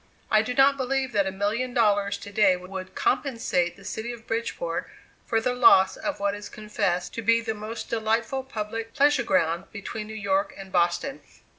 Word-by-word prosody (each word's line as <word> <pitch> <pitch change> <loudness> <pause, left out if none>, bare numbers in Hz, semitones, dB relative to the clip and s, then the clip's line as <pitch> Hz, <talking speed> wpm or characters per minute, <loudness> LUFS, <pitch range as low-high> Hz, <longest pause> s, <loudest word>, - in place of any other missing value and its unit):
I 215 - +6
do 250 +3 -3
not 275 +1 +5
believe 265 0 -1
that 200 -3 +2
a - - -1
million 215 +6 -2
dollars 205 -3 +2
to 200 - -10
day 200 -3 +4
would 185 +1 -8
compensate 230 - 0
the - - -16
city 225 +2 -4
of 230 -2 -10
Bridgeport 235 - -3 0.4
for 225 - +2
the 245 +2 0
loss 190 -6 +6
of 300 - -4
what 200 0 0
is 205 0 -7
confessed 185 -4 -2
to 230 - -4
be 230 +2 +4
the 225 -1 -3
most 215 +2 -7
delightful 225 +3 0
public 225 -2 -5
pleasure 290 0 +4
ground 170 -4 +1
between 215 +1 -6
New 220 - -8
York 290 +8 0
and 195 -1 -10
Boston. 175 +10 0
220 Hz, 185 wpm, -26 LUFS, 200-245 Hz, 0.4 s, I